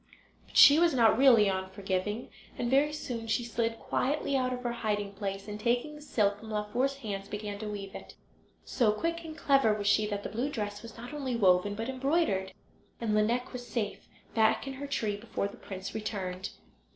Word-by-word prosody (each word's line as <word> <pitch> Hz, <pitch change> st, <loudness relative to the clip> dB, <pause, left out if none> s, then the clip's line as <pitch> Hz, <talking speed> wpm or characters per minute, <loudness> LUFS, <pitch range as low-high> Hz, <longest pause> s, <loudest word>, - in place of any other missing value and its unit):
But -, -, -5 dB
she 290 Hz, +2 st, +9 dB
was 335 Hz, -4 st, +4 dB
not 230 Hz, -3 st, +5 dB
really 240 Hz, -5 st, +6 dB
unforgiving, 190 Hz, +3 st, -2 dB, 0.3 s
and 240 Hz, 0 st, -1 dB
very 285 Hz, +3 st, +4 dB
soon 245 Hz, -6 st, -5 dB
she 220 Hz, +2 st, +1 dB
slid 230 Hz, -1 st, -1 dB
quietly 280 Hz, +4 st, -1 dB
out 255 Hz, -1 st, +1 dB
of 250 Hz, 0 st, -4 dB
her 240 Hz, -, -1 dB
hiding 210 Hz, -3 st, -2 dB
place, 195 Hz, 0 st, -4 dB
and 210 Hz, 0 st, -6 dB
taking 240 Hz, +6 st, 0 dB
the 300 Hz, -, -11 dB
silk 205 Hz, -8 st, +1 dB
from 220 Hz, -, -10 dB
Laufer's 220 Hz, +6 st, -1 dB
hands 200 Hz, -7 st, -5 dB
began 205 Hz, -1 st, -5 dB
to 215 Hz, -, -5 dB
weave 200 Hz, -2 st, -6 dB
it. -, -, -10 dB, 0.5 s
So 235 Hz, -5 st, +2 dB
quick 335 Hz, +8 st, -2 dB
and 315 Hz, -1 st, -8 dB
clever 275 Hz, -8 st, +3 dB
was 205 Hz, -1 st, -4 dB
she 210 Hz, +1 st, +3 dB
that 205 Hz, -1 st, -3 dB
the -, -, -4 dB
blue 245 Hz, +6 st, -2 dB
dress 205 Hz, -6 st, -4 dB
was 230 Hz, -1 st, -11 dB
not 245 Hz, +5 st, -8 dB
only 270 Hz, -4 st, -2 dB
woven 195 Hz, -1 st, +3 dB
but 225 Hz, +2 st, -4 dB
embroidered, 265 Hz, -, 0 dB, 0.5 s
and 225 Hz, -2 st, -1 dB
Lineik 235 Hz, +5 st, +1 dB
was 245 Hz, -1 st, -7 dB
safe 215 Hz, -4 st, -3 dB, 0.3 s
back 220 Hz, +2 st, +3 dB
in 270 Hz, -, -5 dB
her 280 Hz, +2 st, -6 dB
tree 215 Hz, -7 st, -1 dB
before 205 Hz, -2 st, -3 dB
the 200 Hz, -, -11 dB
prince 190 Hz, -1 st, -7 dB
returned. 190 Hz, -4 st, -4 dB
220 Hz, 200 wpm, -30 LUFS, 205-255 Hz, 0.5 s, she